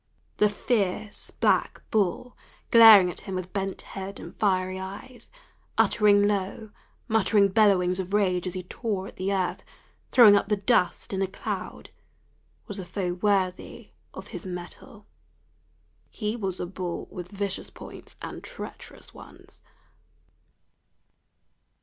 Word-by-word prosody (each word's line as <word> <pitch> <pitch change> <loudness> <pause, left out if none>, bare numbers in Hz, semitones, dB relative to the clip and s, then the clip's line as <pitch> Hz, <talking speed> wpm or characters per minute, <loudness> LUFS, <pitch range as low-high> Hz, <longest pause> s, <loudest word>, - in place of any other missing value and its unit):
The 210 - +4
fierce 205 -1 -2
black - - 0
bull 215 +4 0 0.4
glaring 220 -6 +9
at - - -8
him 195 - -6
with 185 0 -5
bent 195 -1 -3
head 195 0 -7
and - - -10
fiery 185 -2 0
eyes, 200 +7 -9 0.5
uttering 205 -1 +4
low, 205 +2 -3 0.4
muttering 215 -2 +3
bellowings 190 -3 +3
of 185 0 -4
rage 185 -3 +1
as 180 - -5
he 185 - -4
tore 195 0 -4
at - - -11
the 190 +1 -2
earth, 185 -2 -1 0.5
throwing 220 -5 +8
up 200 - +1
the 210 - +2
dust 200 -2 +1
in 190 - -1
a 195 - +1
cloud, 190 - -6 0.7
was 205 -3 -6
a - - -4
foe 180 0 -3
worthy 185 -1 -1 0.2
of - - -10
his - - -7
mettle. 180 -2 -9 1.0
He 215 0 -3
was 195 -5 -4
a - - -2
bull 180 -1 -5
with 180 -1 -8
vicious 200 -1 -4
points - - -12
and - - -7
treacherous - - -10
ones. - - -15
195 Hz, 135 wpm, -26 LUFS, 185-210 Hz, 1.0 s, glaring